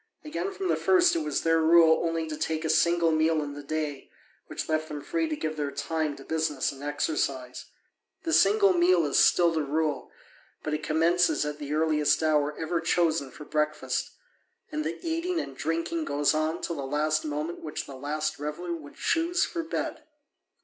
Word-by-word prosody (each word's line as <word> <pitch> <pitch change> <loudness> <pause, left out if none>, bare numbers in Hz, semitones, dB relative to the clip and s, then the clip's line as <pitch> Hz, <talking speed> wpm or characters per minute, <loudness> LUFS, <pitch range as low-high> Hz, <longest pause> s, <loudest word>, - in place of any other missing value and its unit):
Again, 315 +6 -3
from 390 -1 -4
the - - +2
first 360 -2 +4
it - - +1
was 305 - -2
their 165 0 +3
rule 160 0 +5
only 165 -1 -1
to 155 - -4
take 160 +1 -2
a - - 0
single 170 +1 +3
meal 160 0 +2
in 145 -1 -6
the 145 - -8
day, 150 -1 -4 0.4
which - - -5
left 155 0 0
them 150 -1 -5
free 330 -1 -1
to 310 - -1
give 155 - -4
their 145 -1 -1
time 150 +1 -2
to 135 - -12
business 155 -3 -1
and 135 - -12
exercise. 145 -3 -2 0.6
The 325 - -1
single 200 -1 +5
meal 175 -1 +4
is 145 - +2
still 170 -1 +5
the 160 -1 0
rule, 150 +1 -1 0.5
but 155 - -2
it 150 - -1
commences 165 +2 +2
at 150 0 -4
the 145 0 -3
earliest 155 -1 +2
hour 150 -1 +1
ever 165 +1 -1
chosen 160 -5 +1
for 150 - -11
breakfast, 150 -4 -1 0.6
and 150 0 -2
the 165 +2 -3
eating 335 +2 -1
and 135 - -6
drinking 165 - -2
goes 145 0 +1
on 155 +2 -1
till 170 - -3
the - - -3
last 155 +2 0
moment 155 +3 -3
which 155 - -5
the 140 - -9
latest 150 +3 -3
reveller 150 +4 -4
would 150 -4 -9
choose 340 +2 +1
for 335 - -4
bed. 325 -2 -4
155 Hz, 190 wpm, -27 LUFS, 150-170 Hz, 0.6 s, rule